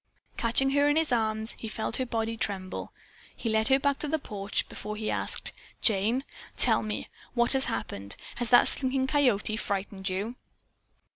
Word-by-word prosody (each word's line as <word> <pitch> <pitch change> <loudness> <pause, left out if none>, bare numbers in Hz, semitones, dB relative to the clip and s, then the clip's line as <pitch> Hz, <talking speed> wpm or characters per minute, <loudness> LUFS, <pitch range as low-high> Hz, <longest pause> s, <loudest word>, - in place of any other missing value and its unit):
Catching 255 +4 +2
her 285 +1 +3
in 290 - +3
his 320 -3 +1
arms, 220 -1 +1
he 225 - -5
felt 220 0 -2
her 255 - -2
body 225 -1 -1
tremble. 195 -4 -2 0.4
He 230 - -3
led 220 0 +2
her 265 0 +5
back 280 0 0
to 300 - -2
the 315 +2 +1
porch 205 -8 -3
before 210 +1 -6
he 215 0 -2
asked, - - 0 0.3
"Jane, 220 +5 +2 0.3
tell - - +4
me. 215 -1 -4 0.3
What 240 +1 +6
has 265 0 +3
happened? 100 0 -4 0.2
Has 240 -2 -2
that 245 - +7
Slinking 260 0 +1
Coyote 250 -7 +2
frightened 195 -2 -2
you?" 205 +6 -3
225 Hz, 170 wpm, -28 LUFS, 210-265 Hz, 0.4 s, that